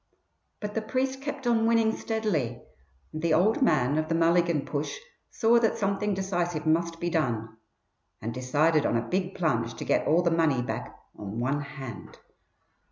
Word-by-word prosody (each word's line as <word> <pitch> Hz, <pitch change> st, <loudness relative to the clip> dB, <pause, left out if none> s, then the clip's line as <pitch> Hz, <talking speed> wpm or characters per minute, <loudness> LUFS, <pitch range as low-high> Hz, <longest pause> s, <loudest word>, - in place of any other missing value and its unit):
But 210 Hz, -1 st, -5 dB
the 220 Hz, -, -1 dB
priest 260 Hz, +4 st, -2 dB
kept 280 Hz, -1 st, -5 dB
on 230 Hz, -2 st, +3 dB
winning 225 Hz, -1 st, +3 dB
steadily, 160 Hz, -, -2 dB, 0.5 s
and 155 Hz, -, -4 dB
the 165 Hz, -1 st, +3 dB
"old 215 Hz, -, +3 dB
man" 145 Hz, -, +3 dB
of 155 Hz, 0 st, -2 dB
the 165 Hz, -, +1 dB
Mulligan 170 Hz, -2 st, +2 dB
push 145 Hz, 0 st, -3 dB, 0.3 s
saw 235 Hz, +1 st, +3 dB
that 230 Hz, -1 st, +1 dB
something 200 Hz, -1 st, 0 dB
decisive 175 Hz, -4 st, -2 dB
must 165 Hz, +1 st, +1 dB
be 175 Hz, 0 st, -2 dB
done, 115 Hz, -9 st, -1 dB, 0.6 s
and 115 Hz, +2 st, -4 dB
decided 145 Hz, +5 st, +2 dB
on 115 Hz, -, +1 dB
a 115 Hz, -, -3 dB
big 185 Hz, 0 st, -1 dB
plunge 120 Hz, -10 st, 0 dB
to -, -, -6 dB
get -, -, +1 dB
all 165 Hz, +3 st, +4 dB
the 170 Hz, -, +2 dB
money 160 Hz, -6 st, +2 dB
back -, -, -5 dB, 0.2 s
on 105 Hz, +2 st, -6 dB
one 135 Hz, +4 st, 0 dB
hand. 135 Hz, -5 st, -9 dB
165 Hz, 170 wpm, -27 LUFS, 140-210 Hz, 0.6 s, all